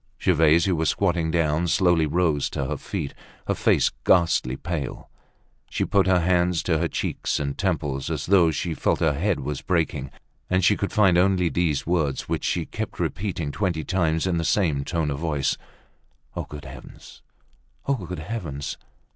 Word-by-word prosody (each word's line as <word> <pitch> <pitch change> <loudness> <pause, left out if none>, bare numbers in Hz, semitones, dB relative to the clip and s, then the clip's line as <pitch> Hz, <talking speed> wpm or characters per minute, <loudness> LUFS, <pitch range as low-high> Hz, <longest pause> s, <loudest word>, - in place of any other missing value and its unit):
Gervaise, 80 -1 +4
who 95 -2 +2
was 80 0 +1
squatting 85 -4 +1
down, 80 0 +1
slowly 85 -3 +3
rose 80 -3 +1
to 70 - -3
her - - -3
feet, 70 - -5 0.3
her - - +2
face - - +2
ghastly 85 -8 +3
pale. 80 -5 -5 0.6
She - - -1
put 100 -1 +2
her 90 -2 +4
hands 90 -1 +2
to 80 -3 +1
her - - +1
cheeks - - -2
and 70 -1 -2
temples, 75 -8 -1
as - - -3
though 90 -3 +5
she 80 +2 -2
felt - - 0
her 80 -3 +2
head 90 +4 0
was 75 +1 -4
breaking; 80 -6 -1 0.4
and 90 0 +2
she 105 - +5
could 100 - -3
find 95 -5 +4
only 90 -2 +3
these 80 -6 0
words, 80 -6 0
which - - -2
she - - -1 0.3
repeated 85 -7 -2
twenty 90 -6 -1
times 80 -3 0
in 90 -2 0
the 85 - 0
same 80 -5 +1
tone 80 -1 -1
of 70 - -3
voice: 75 -4 0 0.8
"Ah! - - -3
good 75 -1 -9
heavens!—ah! 140 - -9
good 90 -8 -5
heavens! 80 -11 -5
85 Hz, 170 wpm, -24 LUFS, 75-90 Hz, 0.8 s, though